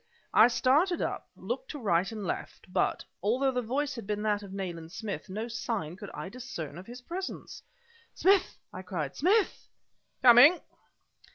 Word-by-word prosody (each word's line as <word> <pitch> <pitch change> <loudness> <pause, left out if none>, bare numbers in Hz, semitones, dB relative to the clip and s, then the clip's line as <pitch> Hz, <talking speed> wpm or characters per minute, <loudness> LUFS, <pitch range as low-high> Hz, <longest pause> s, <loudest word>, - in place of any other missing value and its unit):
I 220 - +8
started 290 +9 +2
up, - - -3
looked - - -4
to 295 - -5
right 190 -3 +1
and 215 -3 -5
left; 180 +1 -5
but, 180 - 0 0.2
although 250 +7 +2
the 250 -1 -1
voice 275 +5 -1
had 230 -6 -8
been 210 0 -2
that 210 -1 +1
of 200 -2 -10
Nayland 175 -4 -5
Smith, 205 0 -5
no 215 +5 -4
sign 230 -9 -3
could - - -9
I - - -5
discern 185 - -7
of 185 - -12
his 245 +2 -9
presence! 370 +7 -6 0.5
"Smith!" 380 0 +3 0.2
I 185 - -6
cried 170 -7 -4
"Smith!" 395 +6 +2 0.6
"Coming!" 255 +8 +8
230 Hz, 165 wpm, -29 LUFS, 190-270 Hz, 0.6 s, I